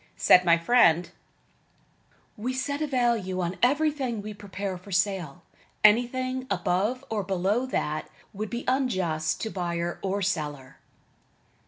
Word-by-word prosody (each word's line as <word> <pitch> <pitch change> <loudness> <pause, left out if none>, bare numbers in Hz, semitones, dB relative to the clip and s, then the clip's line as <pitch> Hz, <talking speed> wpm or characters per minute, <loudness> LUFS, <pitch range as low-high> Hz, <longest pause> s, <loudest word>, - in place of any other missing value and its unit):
Said 180 - +6
my 170 -1 +5
friend: 170 -3 +4 1.2
"We 245 +5 -3
set 285 +2 -2
a - - +1
just - - -8
value 235 -8 0
on 180 0 -3
everything 275 -3 +1
we 215 0 -6
prepare 200 -1 -5
for 185 +3 -12
sale. 185 -6 -1 0.4
Anything 255 +4 +3
above 205 +9 0
or 215 -2 0
below 195 +6 0
that, 155 -11 -2 0.2
would 210 +1 -4
be 240 +1 -5
unjust 185 - 0
to 220 - -3
buyer 175 -2 -3
or 195 +1 -1
seller." 150 -8 -3
200 Hz, 135 wpm, -26 LUFS, 175-245 Hz, 1.2 s, Said